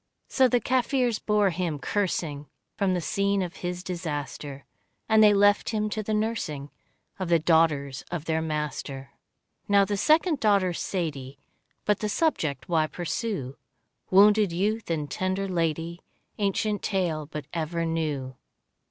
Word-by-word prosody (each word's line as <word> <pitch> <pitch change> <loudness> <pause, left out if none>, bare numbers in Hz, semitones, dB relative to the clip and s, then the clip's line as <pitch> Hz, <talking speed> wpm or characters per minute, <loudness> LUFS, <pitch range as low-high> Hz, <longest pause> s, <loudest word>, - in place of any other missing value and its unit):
So 260 -1 +4
the 245 0 +2
Kaffirs 250 -2 +1
bore 210 -2 +2
him, 170 -3 -2
cursing, 155 -5 -2 0.3
From 195 -3 +1
the 175 - -1
scene 200 +2 0
of 175 -1 -6
his 180 0 -4
disaster, 145 -6 -5 0.4
And 220 -1 +5
they 210 - +8
left 205 0 +4
him 215 -1 -1
to 215 - -2
the 215 +1 -1
nursing 185 -10 -2 0.5
Of 185 -2 -3
the 170 - +5
daughters 155 -4 +2
of 175 -3 -4
their 160 -1 0
master. 150 -3 -4 0.6
Now 200 -1 +5
the 205 0 -2
second 310 - +3
daughter, 200 -5 +3
Sadie 145 -8 -4 0.2
— - - -46
But 210 -1 +2
the 210 - -2
subject 165 - 0
why 160 -3 +2
pursue? 175 - -4 0.5
Wounded 205 0 +6
youth 210 +5 -1
and 155 -3 -1
tender 185 +6 -2
lady, 165 -1 -2 0.4
Ancient 205 +1 0
tale 170 -7 -1
but 150 -2 -6
ever 165 0 -2
new. 150 -5 -2
180 Hz, 145 wpm, -26 LUFS, 155-205 Hz, 0.6 s, they